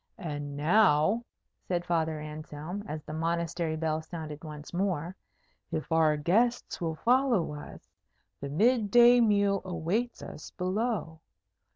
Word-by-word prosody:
"And 145 -7 -5
now," 190 +5 +3 0.4
said 175 -1 -1
Father 160 -2 0
Anselm, 155 +5 -7
as 155 0 -5
the 150 - -8
Monastery 165 0 -1
bell 160 0 -1
sounded 155 -2 -7
once 150 0 -9
more, 180 -2 -1 0.6
"if 160 0 -4
our 160 -2 +4
guests 220 +12 +1
will 165 -2 -1
follow 240 - +2
us, 145 - -10 0.5
the 140 - -5
mid 220 - +2
day 240 +2 +7
meal 200 -3 +3
awaits 185 +7 -2
us 150 - -9
below. 185 -3 -2
170 Hz, 130 wpm, -29 LUFS, 155-205 Hz, 0.6 s, day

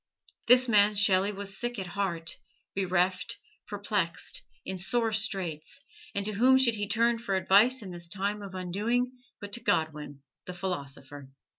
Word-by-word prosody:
This 250 +1 +7
man 210 -2 +5
Shelley 200 -1 +4
was 200 -1 -4
sick 240 -1 -2
at 190 - -3
heart, 175 -3 -3 0.4
bereft, 185 -1 0 0.3
perplexed, 200 -4 -2 0.2
in 190 - -4
sore 225 +4 0
straits, 195 - -2 0.4
and 200 0 -1
to 215 - 0
whom 255 +6 +5
should 260 -3 +4
he 205 -1 -2
turn 230 +2 +2
for 200 -4 -2
advice 210 +6 +4
in 190 - -7
this 170 -1 -6
time 200 +3 -2
of 195 -2 -8
undoing 210 +8 -1 0.3
but 205 0 -9
to 240 - -3
Godwin, 150 - -1 0.2
the 180 - -7
philosopher! 140 -6 -6
200 Hz, 155 wpm, -29 LUFS, 180-220 Hz, 0.4 s, This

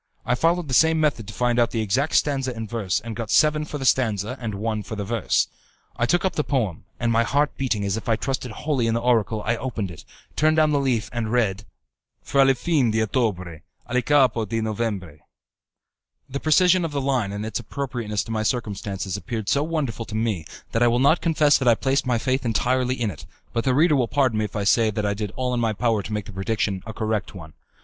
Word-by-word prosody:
I 125 - +1
followed 165 +5 +1
the 130 - -4
same 160 +4 +4
method 140 -9 0
to 105 - -7
find 120 0 +1
out 120 -1 +3
the 115 - -2
exact 130 +9 0
stanza 135 -4 +1
and 115 -1 -5
verse, 105 -5 -1
and 115 -1 -6
got 115 -1 -5
seven 150 0 +3
for 150 - -5
the 135 - -4
stanza 115 -3 +1
and 110 -3 -3
one 110 +1 -2
for 105 +2 -7
the 105 -1 -4
verse. 115 0 +1 0.5
I 120 - 0
took 175 +6 +2
up 190 - +1
the 150 - 0
poem, 115 - -2
and 120 -1 +1
my 115 0 +3
heart 145 +5 +1
beating 110 -7 -1
as 100 +2 -1
if 110 - -5
I 115 - +4
trusted 130 +2 -3
wholly 125 +1 -1
in 115 - +1
the - - +1
oracle, 115 -3 +1
I 115 +1 +1
opened 115 -8 -4
it, 80 - -11 0.3
turned 155 +1 +3
down 155 -1 +4
the 145 - +2
leaf, 125 -5 0
and 115 -2 -2
read; 105 -4 0 0.6
Fra 135 -1 +3
il 135 - +4
fin 145 -3 +1
d'ottobre, 110 -7 -1 0.2
a 120 - -5
il 125 - +3
capo 130 -5 +3
di 115 +2 -2
novembre. 105 -8 -3 1.1
The 140 +1 -4
precision 180 +4 +4
of 165 - -2
the 140 - 0
line 130 -7 0
and 105 +1 -4
its 110 +1 -3
appropriateness 120 -3 -3
to - - -8
my 110 -1 -1
circumstances 105 -4 -2
appeared 105 +2 -4
so 140 - +2
wonderful 145 -8 -2
to 110 - -7
me, 110 -7 -1 0.3
that 115 - 0
I 120 - +6
will 120 0 +2
not 140 +6 +4
confess 155 -3 +3
that 130 - -1
I 120 - +6
placed 135 +2 0
my 125 -2 +2
faith 130 +3 0
entirely 125 +2 0
in 110 -4 0
it; 75 - -12 0.3
but 115 - -1
the 130 -1 +2
reader 155 +2 +4
will 125 -4 +2
pardon 130 -4 +1
me 110 - +1
if 105 - -9
I 105 - -1
say 110 +2 +3
that 105 -1 -2
I 100 - +1
did 105 0 -4
all 125 -1 -1
in 120 - 0
my 115 -2 +1
power 115 0 +1
to 100 - -8
make 105 -1 -2
the - - -9
prediction 95 0 -2
a - - -4
correct 110 -2 -2
one. 80 -4 -10
115 Hz, 240 wpm, -23 LUFS, 105-135 Hz, 1.1 s, I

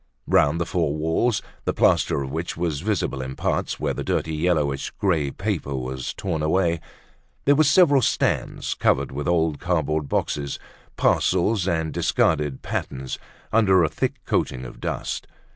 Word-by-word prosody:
Round 75 +3 +3
the 85 - 0
four 80 -4 0
walls, 80 +9 +1 0.2
the - - 0
plaster 70 - +3
of 65 - -6
which 80 +2 -3
was 85 -4 -1
visible 95 -9 -1
in 65 0 -5
parts - - -1
where - - 0
the - - -4
dirty 80 - -1
yellowish 75 -4 0
grey 80 -8 +1
paper 70 0 -3
was 65 0 -4
torn 85 -5 -2
away, 85 +1 +2 0.7
there 145 - +6
were 155 +2 +4
several 145 -2 +5
stands - - 0
covered - - +1
with 70 +4 -4
old 80 -4 +1
cardboard 80 -4 0
boxes, 70 -2 -1 0.4
parcels 95 +1 +2
and 80 -3 0
discarded 75 -5 +1
patterns 65 0 -4 0.3
under 95 -5 +5
a 80 - +2
thick 130 - -1
coating 65 -1 -1
of 60 - -10
dust. - - -3
80 Hz, 155 wpm, -24 LUFS, 70-90 Hz, 0.7 s, there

